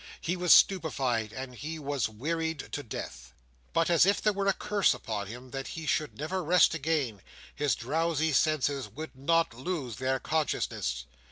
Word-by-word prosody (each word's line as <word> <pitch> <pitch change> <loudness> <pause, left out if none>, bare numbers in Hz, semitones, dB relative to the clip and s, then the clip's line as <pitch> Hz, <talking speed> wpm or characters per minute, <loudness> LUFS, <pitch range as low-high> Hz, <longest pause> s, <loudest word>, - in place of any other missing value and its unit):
He 175 - -1
was 180 -1 +1
stupefied, 130 - +4
and 130 +1 -7
he 155 +7 -6
was 140 -5 -1
wearied 160 +6 -3
to 145 - -3
death. 65 - -8 0.4
But, 165 - +2
as 170 -2 +5
if 200 +3 +3
there 210 - +2
were 200 0 -1
a 200 - +4
curse 205 0 +2
upon 105 -4 -4
him 125 +4 -9
that 135 -1 -4
he 165 -1 -6
should 150 0 -1
never 180 +5 -2
rest 175 +1 +5
again, 145 - -1 0.3
his 145 -1 +1
drowsy 160 +4 0
senses 145 -4 +1
would 155 +7 -8
not 165 +1 +2
lose 130 - -4
their 130 0 0
consciousness. 125 - -1
150 Hz, 170 wpm, -29 LUFS, 130-165 Hz, 0.4 s, as